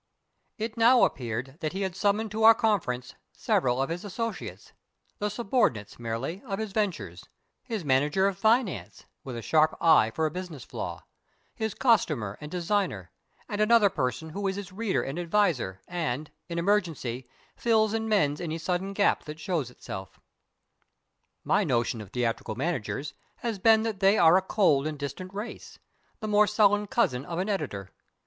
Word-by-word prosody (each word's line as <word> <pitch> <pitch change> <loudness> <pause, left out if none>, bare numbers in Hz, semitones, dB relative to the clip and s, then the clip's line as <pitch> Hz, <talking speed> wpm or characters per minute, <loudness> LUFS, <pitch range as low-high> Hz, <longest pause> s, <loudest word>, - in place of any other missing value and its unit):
It 220 +1 -4
now 235 +2 +6
appeared 120 +3 -2
that 155 0 -3
he 195 +1 -2
had 190 -2 -3
summoned 210 +2 +1
to 220 +1 -3
our 225 0 +9
conference 135 - 0 0.2
several 125 -1 +1
of 135 - 0
his 175 +1 -4
associates 215 +1 -5 0.5
the 210 - 0
subordinates, 205 - 0
merely, 120 - -4
of 195 -2 -2
his 220 -1 -4
ventures 140 - -3 0.3
his 220 - -5
manager 145 +7 +2
of 200 -1 +1
finance 220 +1 0 0.2
(with 130 -3 -6
a 115 - -6
sharp 155 +3 +3
eye 160 -9 +5
for 160 +8 -1
a 155 - 0
business 175 -6 -7
flaw), - - -6 0.5
his 220 -2 -3
costumer 150 - +2
and 150 - -7
designer, 175 - -1 0.4
and 205 0 -2
another 215 -2 +5
person 130 -1 -2
who 200 +4 -2
is 190 - -1
his 200 -2 -7
reader 215 0 0
and 135 +6 -4
adviser 170 - 0
and, 155 -4 -3 0.2
in 170 - -4
emergency, 165 - -1 0.3
fills 220 -2 +2
and 225 0 -1
mends 150 -8 +2
any 165 -2 -3
sudden 180 +4 -2
gap 200 0 +2
that 150 +1 -8
shows 160 -7 -2
itself. 95 -6 -9 1.2
My - - +2
notion 120 -2 0
of 100 - -10
theatrical 115 -2 -2
managers 140 0 -3 0.3
has 225 -4 -2
been 220 +2 +5
that 220 -4 -3
they 195 +2 +4
are 165 +1 +6
a 190 - +5
cold 185 -8 +2
and 155 -1 -4
distant 145 +6 -6
race 205 +4 -7 0.4
the 215 - -3
more 210 0 +4
sullen 205 -1 +3
cousin 200 - +1
of 170 +3 -5
an 190 +4 -1
editor. 105 - -3
180 Hz, 170 wpm, -27 LUFS, 135-210 Hz, 1.2 s, our